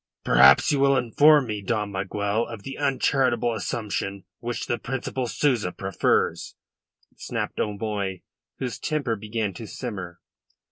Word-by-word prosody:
"Perhaps 65 - +6
you 145 - +1
will 140 0 +4
inform 145 +4 +5
me, 105 -3 -4
Dom 105 0 -1
Miguel, 100 +3 -1
of 115 -4 -8
the 135 - -6
uncharitable 130 -4 +1
assumption 100 -2 -3 0.2
which 120 0 -4
the 120 -2 -2
Principal 130 +1 -3
Souza 120 -7 +1
prefers," 95 +1 0 0.6
snapped - - -4
O'Moy, 100 -3 -2 0.3
whose 125 -3 -4
temper 145 -7 -1
began 105 -1 -3
to 110 +5 -8
simmer. 95 -9 -6
110 Hz, 130 wpm, -25 LUFS, 100-130 Hz, 0.6 s, Perhaps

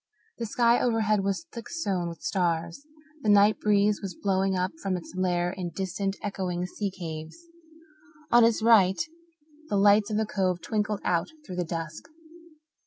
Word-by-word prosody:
The 230 - -2
sky 235 +2 +3
overhead 215 -4 +2
was 200 - -2
thick 235 0 -8
sown 190 - -2
with 165 -3 -10
stars; 170 - -1 0.3
the 215 - 0
night 205 +1 +5
breeze 210 0 +2
was 190 -4 -5
blowing 195 -1 0
up 185 +1 0
from 190 -2 -1
its 175 - -10
lair 175 -1 0
in 180 -2 -5
distant, 195 +2 -3
echoing 180 -3 -2
sea 200 +2 -3
caves. 160 - -7 0.9
On 240 0 +7
his 225 -1 +3
right 200 -5 +5 0.7
the 205 - +1
lights 205 +1 +5
of 210 - -1
the 220 - +1
Cove 185 -4 0
twinkled 210 +2 -2
out 170 -2 +1 0.2
through 180 - -7
the 180 - +1
dusk. 165 -1 -5
195 Hz, 165 wpm, -27 LUFS, 180-210 Hz, 0.9 s, On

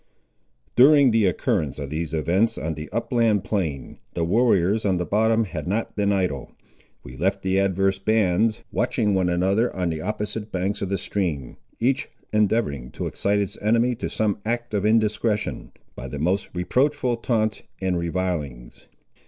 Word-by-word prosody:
During 140 0 +7
the 110 -2 +3
occurrence 75 -5 0
of 70 -1 -6
these 80 +1 -3
events 85 +8 +1
on 80 +1 -2
the 75 0 -7
upland 115 -2 +1
plain, 80 - -3 0.2
the 85 - 0
warriors 100 +1 +2
on 95 -3 +1
the 90 - -1
bottom 110 +3 +2
had 95 - -5
not 105 +5 -2
been 100 -1 +1
idle. 90 -9 -2 0.5
We 60 - -10
left 95 +6 -1
the 95 0 +2
adverse 95 0 +1
bands 110 +2 +1
watching 110 0 +1
one 95 -2 +2
another 95 +7 +1
on 90 -2 -1
the 80 -1 -4
opposite 105 +2 -4
banks 95 +2 -2
of 100 - -2
the 100 - 0
stream, 80 -13 -3 0.2
each 130 +4 0 0.2
endeavouring 105 - +1
to - - -4
excite 100 +1 0
its 100 -2 -2
enemy 115 +4 +2
to - - -3
some 105 -2 -1
act 120 +1 -3
of 105 0 +1
indiscretion, 110 -1 0 0.2
by - - -7
the 75 - -6
most 90 +7 0
reproachful 125 +7 +1
taunts 110 -2 0 0.2
and 95 -2 0
revilings. 85 -8 -4
100 Hz, 160 wpm, -24 LUFS, 90-110 Hz, 0.5 s, During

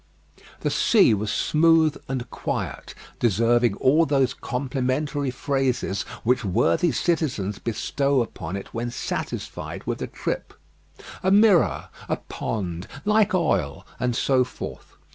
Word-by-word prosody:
The - - 0
sea 200 - +4
was 105 0 -1
smooth 160 +4 +3
and 130 -2 -3
quiet; - - -4 0.2
deserving 115 0 +3
all 150 +8 +3
those 135 -3 +2
complimentary 135 +2 -2
phrases 130 -5 -1 0.2
which 125 +1 +2
worthy 120 - +2
citizens 125 - -1
bestow 135 +3 0
upon 90 -5 -7
it 100 - -7
when 120 +1 -2
satisfied 120 - -5
with - - -3
a - - -2
trip. - - -4 0.7
"A 190 - +1
mirror," 200 -2 +4 0.2
"a - - +2
pond," 90 -5 -4 0.2
"like 210 -2 +3
oil," 90 - 0
and 125 -1 0
so 130 0 +3
forth. 125 - -9
130 Hz, 125 wpm, -24 LUFS, 115-150 Hz, 0.7 s, sea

